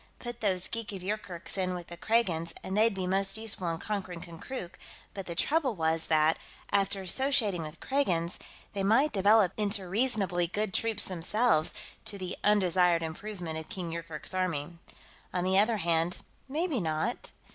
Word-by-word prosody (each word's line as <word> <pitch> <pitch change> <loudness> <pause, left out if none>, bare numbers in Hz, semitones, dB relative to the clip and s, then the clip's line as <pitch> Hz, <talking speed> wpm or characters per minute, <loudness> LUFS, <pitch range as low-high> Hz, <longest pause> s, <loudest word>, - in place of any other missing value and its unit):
Put 240 -1 -7
those 185 -4 +1
geeks 230 -2 -4
of 190 -2 -6
Yoorkerk's 195 -2 -3
in 185 -1 0
with 175 -1 -6
the 170 - -9
Kragans 175 -5 +1
and 190 - -3
they'd 220 0 +4
be 190 -1 -2
most 195 +2 +3
useful 215 -5 -2
in 165 - -2
conquering 190 -3 -4
Konkrook, 175 +3 -7 0.3
but 195 -2 -6
the 170 - -4
trouble 280 - +2
was 160 -1 +1
that, 155 0 +4 0.3
after 195 -1 +1
associating 215 -3 +2
with 155 +1 -7
Kragans, 180 -12 +1 0.3
they 200 - -2
might 230 +10 +4
develop 205 -1 +5
into 205 -2 -1
reasonably 195 -5 +1
good 205 +2 -2
troops 225 -2 +1
themselves, 185 0 +2 0.3
to 205 - -2
the 185 -2 -4
undesired 180 -4 +4
improvement 170 -1 -5
of 160 - -10
King 175 -3 -4
Yoorkerk's 165 0 -5
army. 170 -3 -2 0.6
On 180 - +1
the 190 +1 +4
other 220 +2 +3
hand 170 -1 +1 0.3
maybe 310 -1 0
not. 160 +7 -2
190 Hz, 165 wpm, -30 LUFS, 170-215 Hz, 0.6 s, develop